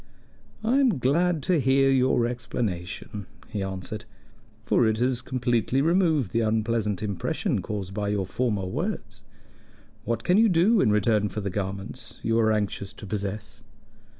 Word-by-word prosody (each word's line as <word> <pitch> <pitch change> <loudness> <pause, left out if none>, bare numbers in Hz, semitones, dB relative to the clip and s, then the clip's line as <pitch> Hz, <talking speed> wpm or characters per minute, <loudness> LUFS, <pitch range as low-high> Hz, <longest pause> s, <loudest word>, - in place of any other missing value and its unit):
"I 235 +5 +2
am 250 - +3
glad 155 +5 +1
to 175 +1 +2
hear 135 +1 +4
your 130 -2 +3
explanation," 105 -4 -4 0.2
he 105 -3 -3
answered, 95 +2 -5 0.6
"for 115 +1 +3
it 110 0 +1
has 125 +1 +1
completely 120 0 0
removed 160 - +2
the 115 - +1
unpleasant 110 -2 0
impression 100 -3 -1
caused 100 -3 -5
by 105 0 -2
your 100 -2 0
former 105 0 -1
words. 95 - -4 0.8
What 115 0 -2
can 180 - +3
you 225 0 +5
do 195 +5 +4
in - - +3
return 105 0 +2
for 105 - -4
the 100 -1 -3
garments 100 +5 -5
you 115 0 +2
are 110 -1 +3
anxious 105 -2 -2
to - - -10
possess? 100 +1 -5
110 Hz, 150 wpm, -26 LUFS, 100-130 Hz, 0.8 s, you